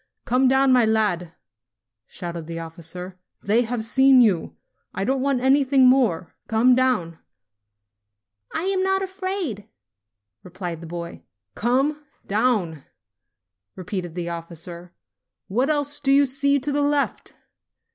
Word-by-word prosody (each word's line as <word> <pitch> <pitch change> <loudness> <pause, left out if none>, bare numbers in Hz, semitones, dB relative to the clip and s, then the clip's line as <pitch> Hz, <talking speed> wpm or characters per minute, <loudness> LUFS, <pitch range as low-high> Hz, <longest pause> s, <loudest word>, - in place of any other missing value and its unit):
"Come 255 +2 +2
down, 265 0 +4
my 250 -2 +5
lad!" 205 -7 0 0.7
shouted 170 -2 -7
the 165 0 -6
officer. 170 +3 -8 0.2
"They 215 +4 +3
have 240 -1 -2
seen 265 +3 +5
you. 200 -9 +2 0.4
I - - -2
don't 265 +4 0
want 275 -2 0
anything 270 0 +4
more. 230 -10 +2
Come 230 +3 +4
down!"; 245 -11 0 1.3
"I'm 380 +2 -1
not 385 0 +1
afraid," 375 - -4 0.7
replied 175 -2 -7
the 165 - -9
boy. 170 0 -7 0.3
"Come 270 - 0 0.2
down!" 200 - 0 0.9
repeated 180 -2 -5
the 175 -1 -3
officer. 170 +1 -8 0.6
"What 250 +8 0
else 290 -1 0
do 275 -1 0
you 280 +1 +5
see 280 +2 +1
to 290 +3 -2
the 290 +1 0
left 285 0 -1
240 Hz, 125 wpm, -23 LUFS, 175-275 Hz, 1.3 s, my